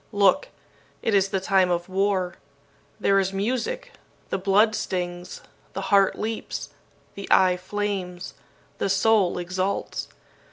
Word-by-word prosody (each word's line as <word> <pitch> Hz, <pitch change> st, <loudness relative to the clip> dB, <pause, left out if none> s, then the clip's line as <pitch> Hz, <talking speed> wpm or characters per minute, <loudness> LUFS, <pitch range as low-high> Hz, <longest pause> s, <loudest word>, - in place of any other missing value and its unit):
"Look! 200 Hz, +5 st, +3 dB, 0.6 s
It 225 Hz, -, +1 dB
is 195 Hz, -1 st, +3 dB
the 195 Hz, -, 0 dB
time 190 Hz, -1 st, +3 dB
of 175 Hz, 0 st, -1 dB
war. 190 Hz, -1 st, 0 dB, 0.7 s
There 195 Hz, 0 st, +3 dB
is 190 Hz, 0 st, 0 dB
music. 245 Hz, -, -2 dB, 0.4 s
The 190 Hz, -, 0 dB
blood 205 Hz, +3 st, +4 dB
stings. 175 Hz, -3 st, -4 dB, 0.3 s
The 195 Hz, +1 st, -4 dB
heart 195 Hz, -1 st, +5 dB
leaps. 220 Hz, +1 st, -4 dB, 0.4 s
The 200 Hz, -, -7 dB
eye 185 Hz, -1 st, +5 dB
flames. 185 Hz, -1 st, -4 dB, 0.5 s
The -, -, 0 dB
soul 195 Hz, -2 st, +3 dB
exults. 185 Hz, +2 st, -2 dB
195 Hz, 125 wpm, -25 LUFS, 185-205 Hz, 0.7 s, heart